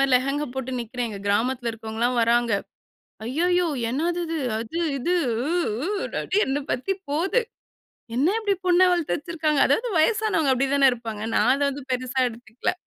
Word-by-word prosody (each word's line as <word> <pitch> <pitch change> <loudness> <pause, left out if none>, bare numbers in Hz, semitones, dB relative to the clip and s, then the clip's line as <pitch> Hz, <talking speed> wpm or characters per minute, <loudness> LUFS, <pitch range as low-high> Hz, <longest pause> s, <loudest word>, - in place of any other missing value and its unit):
மாரி 275 -1 +2
லெகங்கா 275 +3 -1
போட்டு 260 -1 -4
நிக்குறேன். 240 +1 -3
எங்க 200 -2 -7
கிராமத்தில 240 +4 +1
இருக்கிறவங்கலாம் 225 +2 -2
வர்றாங்க. 235 0 +3 0.7
அய்யயோ! 350 +8 +1 0.2
என்னாதிது, 330 +4 -1 0.2
அது, 230 +9 -5 0.2
இது, 350 +8 0 0.3
உ - - -1 0.3
உ, - - -1 0.3
டடி, 390 - -1
என்ன 280 +2 0
பத்தி 325 +11 -1 0.2
போது. 375 +11 +1 0.7
என்ன 280 +7 +3
இப்டி 410 -3 +1
பொண்ண 355 0 +4
வளத்து 330 - 0
வச்சுருக்குறாங்க? 310 -2 -1
அதாவது 485 +2 +1
வயசானவங்க 330 -6 +2
அப்டி 270 +2 +1
தான, 275 -1 +6
இருப்பாங்க. 225 -3 -5
நான் 215 - +4
அத 280 - -4
வந்து, 280 +1 -7
பெருசா 255 +1 -2
எடுத்துக்கல. 230 0 -4
270 Hz, 155 wpm, -24 LUFS, 240-335 Hz, 0.7 s, தான